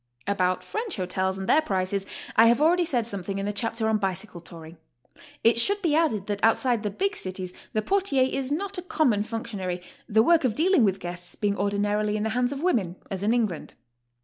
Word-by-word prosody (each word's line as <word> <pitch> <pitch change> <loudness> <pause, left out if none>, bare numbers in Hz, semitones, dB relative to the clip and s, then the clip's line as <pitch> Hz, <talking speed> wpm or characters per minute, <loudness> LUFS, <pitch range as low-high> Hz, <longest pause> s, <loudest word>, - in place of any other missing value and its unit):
About 185 -2 0
French 440 -3 -4
hotels 190 0 -1
and 190 0 -5
their 310 - +5
prices 195 -5 -1 0.3
I 225 +1 +7
have 235 +2 +4
already 345 +3 +4
said 245 -7 0
something 195 -3 -4
in 195 - -2
the 205 - -2
chapter 225 +1 -1
on 220 -1 +2
Bicycle 190 -2 -3
Tauring. 165 -1 -12 0.7
It 230 +1 +4
should 405 +11 +2
be 325 -4 +2
added 295 -11 +1
that 205 -1 -4
outside 230 +1 +3
the 210 - -2
big 395 - -1
cities 185 - -4 0.2
the 215 - 0
portier 375 - +2
is 265 +1 -1
not 380 +5 -2
a - - -4
common 300 - +1
functionary, 205 -5 -4 0.3
the 220 +1 +4
work 335 +4 +4
of 240 -5 +1
dealing 345 -2 +3
with 195 -2 +1
guests 175 0 -6
Being 205 -1 0
ordinarily 205 +1 0
in 210 - -2
the 220 - 0
hands 245 +2 0
of 280 +2 -5
women, 205 - +1 0.2
as 190 -1 -3
in 210 +2 +1
England. 220 -9 -1
215 Hz, 205 wpm, -26 LUFS, 190-265 Hz, 0.7 s, I